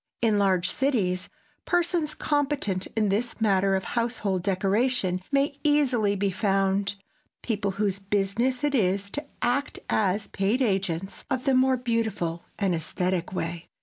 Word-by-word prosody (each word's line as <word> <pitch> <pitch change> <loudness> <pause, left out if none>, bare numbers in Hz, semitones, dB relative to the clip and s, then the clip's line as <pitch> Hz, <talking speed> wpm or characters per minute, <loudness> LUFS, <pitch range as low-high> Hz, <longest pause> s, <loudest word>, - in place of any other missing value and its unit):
In 220 -3 +2
large 185 -3 +2
cities 200 -10 0 0.4
persons 345 -3 0
competent 280 -11 0
in 215 -2 +2
this 225 +5 -1
matter 195 -3 +3
of 190 - -1
household 230 -6 -1
decoration 195 0 +1
may 280 +1 +1
easily 260 -9 +3
be 200 0 0
found, 195 0 +1 0.5
people 205 -4 -1
whose 200 -2 0
business 205 +7 0
it 290 -1 +1
is 200 -4 +1
to 290 - -2 0.2
act 250 +4 0
as 200 0 +1
paid 200 +6 0
agents 195 -6 -1
of 260 -1 -1
the 270 - +3
more 260 0 +4
beautiful 220 -9 -1
and 195 -3 +1
esthetic 175 +2 -1
way. 170 -2 -4
205 Hz, 140 wpm, -26 LUFS, 190-250 Hz, 0.5 s, more